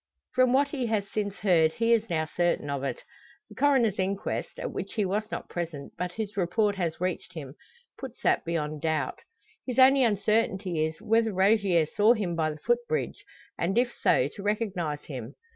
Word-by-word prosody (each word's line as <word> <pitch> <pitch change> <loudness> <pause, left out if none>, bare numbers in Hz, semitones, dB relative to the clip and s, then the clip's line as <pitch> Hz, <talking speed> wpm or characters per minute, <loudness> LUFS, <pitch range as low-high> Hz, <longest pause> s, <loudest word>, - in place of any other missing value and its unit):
From 255 -1 +4
what 275 +2 +3
he 265 -4 -2
has 210 -3 0
since 205 -1 -3
heard 165 -5 +3
he 230 0 +2
is 225 -1 +1
now 160 -2 0
certain 170 -3 0
of 140 -1 -3
it. 135 -3 -3 0.5
The - - -12
coroner's 255 -8 +3
inquest, 195 +1 -2
at - - -4
which - - -6
he 210 -4 +1
was 210 +3 -2
not - - -5
present, 165 -5 -5
but 180 0 -4
whose 210 -1 -5
report 200 +3 +1
has 170 -4 -2
reached 180 0 -3
him, 140 -4 -7 0.5
puts 260 -3 -8
that - - +3
beyond 155 -3 -3
doubt. 155 -4 -1 0.4
His 250 -2 -5
only 265 +1 +7
uncertainty 205 -5 +1
is, 160 - -8
whether 225 0 +2
Rogier 190 -3 +3
saw 210 +9 +4
him 185 -6 -2
by 160 -1 +1
the 155 - -6
footbridge, 240 +8 -1 0.4
and 190 +6 0
if 245 0 +2
so 125 - +2
to 200 - -10
recognise 195 -8 -2
him. 130 -3 -7
195 Hz, 185 wpm, -27 LUFS, 160-225 Hz, 0.5 s, only